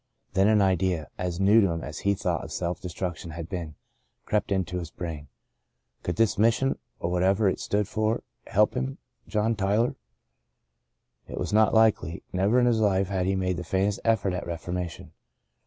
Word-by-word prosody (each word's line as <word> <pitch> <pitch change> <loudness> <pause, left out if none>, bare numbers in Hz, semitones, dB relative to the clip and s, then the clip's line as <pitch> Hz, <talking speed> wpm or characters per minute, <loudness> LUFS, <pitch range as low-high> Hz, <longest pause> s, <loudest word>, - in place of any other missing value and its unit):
Then 95 +1 +4
an 105 -2 +5
idea, 90 -4 +1
as 90 -1 -2
new 105 +3 +6
to 100 - +3
him 85 -1 -3
as 80 - -6
the 100 0 +1
thought - - -1
of - - -8
self 85 -1 -3
destruc 90 -1 -4
tion 85 - -9
had 85 -1 -5
been, 85 -6 -5 0.5
crept 105 -1 0
into 90 -2 0
his 85 -2 -6
brain. 80 -4 -6 0.7
Could 90 - -2
this 110 -2 +2
Mission, 115 +5 +2 0.2
or 85 - -2
whatever 95 +4 +3
it 95 - 0
stood 105 -1 0
for, 110 +1 0 0.2
help - - +3
him, 65 +1 -3 0.3
John 110 +2 +1
Tyler? 105 +4 +1 1.3
It - - -7
was - - -3
not 110 +1 +4
likely. 110 -6 +3
Never 100 +7 +3
in 125 - +4
his 120 -2 +3
life 100 -3 +2
had 95 -2 0
he 95 - +1
made 90 -1 0
the 90 - -4
faintest 95 +4 0
effort 110 -5 +2
at 90 - -4
reformation. 85 0 -5
95 Hz, 185 wpm, -27 LUFS, 90-105 Hz, 1.3 s, new